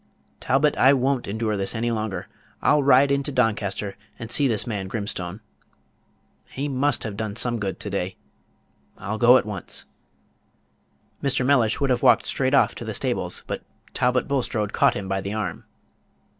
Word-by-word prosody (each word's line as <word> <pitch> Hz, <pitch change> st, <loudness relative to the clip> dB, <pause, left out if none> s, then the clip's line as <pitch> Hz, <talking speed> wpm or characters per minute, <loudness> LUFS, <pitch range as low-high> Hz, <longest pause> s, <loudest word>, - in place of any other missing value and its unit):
Talbot 145 Hz, +3 st, +2 dB
I 135 Hz, +2 st, +6 dB
won't 135 Hz, -1 st, 0 dB
endure 110 Hz, +1 st, -1 dB
this 100 Hz, +3 st, 0 dB
any 120 Hz, +1 st, -1 dB
longer. 110 Hz, -5 st, -3 dB, 0.3 s
I'll 150 Hz, -, +3 dB
ride 140 Hz, 0 st, +5 dB
into 140 Hz, +1 st, 0 dB
Doncaster 105 Hz, -5 st, -1 dB, 0.2 s
and 115 Hz, 0 st, -8 dB
see 145 Hz, -, +2 dB
this 110 Hz, -5 st, +1 dB
man 100 Hz, -5 st, -4 dB
Grimstone. 100 Hz, -2 st, -4 dB, 1.1 s
He 140 Hz, +2 st, -4 dB
must 140 Hz, 0 st, +1 dB
have 110 Hz, -3 st, -5 dB
done 105 Hz, -1 st, -4 dB
some 120 Hz, -1 st, 0 dB
good 100 Hz, -2 st, -4 dB
to 105 Hz, -, -4 dB
day. 95 Hz, -1 st, -3 dB, 0.8 s
I'll 110 Hz, +4 st, -4 dB
go 125 Hz, +1 st, +7 dB
at -, -, -1 dB
once." 100 Hz, -3 st, -4 dB, 1.4 s
Mr. 135 Hz, -2 st, +1 dB
Mellish 125 Hz, -1 st, +3 dB
would 140 Hz, -2 st, +1 dB
have 125 Hz, -, +1 dB
walked -, -, +5 dB
straight -, -, 0 dB
off -, -, +4 dB
to -, -, -7 dB
the -, -, -4 dB
stables; -, -, 0 dB
but -, -, -4 dB, 0.3 s
Talbot 125 Hz, 0 st, +1 dB
Bulstrode 120 Hz, -7 st, -1 dB
caught -, -, +3 dB
him 100 Hz, -1 st, -5 dB
by 95 Hz, 0 st, -1 dB
the 100 Hz, +2 st, -4 dB
arm. 105 Hz, -6 st, -4 dB
115 Hz, 170 wpm, -24 LUFS, 100-130 Hz, 1.4 s, go